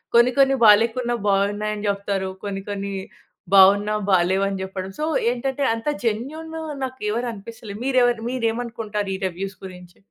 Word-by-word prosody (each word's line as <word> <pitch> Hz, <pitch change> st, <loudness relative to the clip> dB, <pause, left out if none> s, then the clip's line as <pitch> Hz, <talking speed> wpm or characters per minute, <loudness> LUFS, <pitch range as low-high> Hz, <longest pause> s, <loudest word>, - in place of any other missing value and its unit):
కొన్ని 240 Hz, +1 st, +6 dB
కొన్ని 270 Hz, 0 st, +5 dB
బాలేకున్నా 230 Hz, +3 st, +4 dB
బావున్నాయని 205 Hz, +1 st, 0 dB
చెప్తారు. 200 Hz, -1 st, -2 dB
కొన్ని 200 Hz, -1 st, -4 dB
కొన్ని 200 Hz, -1 st, -4 dB, 0.6 s
బావున్నా 200 Hz, +2 st, +6 dB, 0.2 s
బాలేవు 185 Hz, +1 st, +3 dB
అని 195 Hz, -1 st, -4 dB
జెప్పడం. 190 Hz, 0 st, -5 dB
సో 305 Hz, -, 0 dB, 0.3 s
ఏంటంటే 265 Hz, +3 st, -2 dB
అంత 225 Hz, +4 st, -6 dB, 0.2 s
జెన్యూన్ 275 Hz, +9 st, -3 dB, 0.3 s
నాకు 260 Hz, 0 st, -5 dB
ఎవరు 240 Hz, +3 st, -1 dB
అనిపిస్తలే. 215 Hz, 0 st, -9 dB
మీరెవర్ 245 Hz, -3 st, +3 dB
మీరేమనుకుంటారు 225 Hz, -4 st, -2 dB
ఈ -, -, -4 dB
రివ్యూస్ 190 Hz, +2 st, -6 dB
గురించి? 180 Hz, -1 st, -12 dB
210 Hz, 135 wpm, -22 LUFS, 195-240 Hz, 0.6 s, కొన్ని